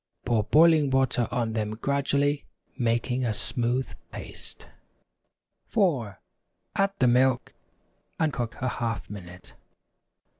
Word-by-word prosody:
Pour 115 -3 +2
boiling 155 -1 +5
water 130 -3 +2
on 115 -2 -1
them 110 -1 -2
gradually, 140 +3 0 0.3
making 120 +1 0
a 110 -3 0
smooth 120 +4 -1 0.2
paste. - - -8 1.0
4. 140 - +1 0.6
Add 195 0 +2
the 130 - +3
milk, 125 +1 +3 0.7
and 155 -3 +2
cook 120 -2 -3
a - - +2
half 115 -5 -3
minute. 90 -3 -10
125 Hz, 110 wpm, -27 LUFS, 115-140 Hz, 1.0 s, boiling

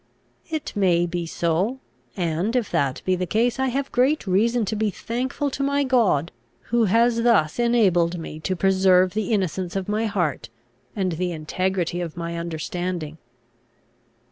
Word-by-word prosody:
"It 315 -6 -4
may 175 -4 +3
be 175 -1 -3
so. 175 +11 0 0.4
And, 175 +6 -1
if 240 -5 0
that 135 -2 0
be 185 - +2
the 180 0 -3
case, 235 +5 +1
I 265 - +2
have 270 +2 -2
great 265 +4 +2
reason 220 +5 +2
to 215 - -2
be 215 0 0
thankful 255 +7 -3
to 275 - -4
my 280 +1 +1
God, 225 - +2 0.4
who 235 -1 +3
has 230 +3 +3
thus 230 -8 +3
enabled 190 -8 +3
me 160 -2 -7
to 185 +4 -2
preserve 185 -1 +3
the 215 0 -2
innocence 185 -3 -1
of 195 -1 -2
my 215 +2 0
heart, 170 - -2 0.5
and 190 -3 0
the 175 +2 -2
integrity 175 +2 -2
of 170 -1 -6
my 170 0 -4
understanding." 170 -1 -4
190 Hz, 160 wpm, -23 LUFS, 170-230 Hz, 0.5 s, may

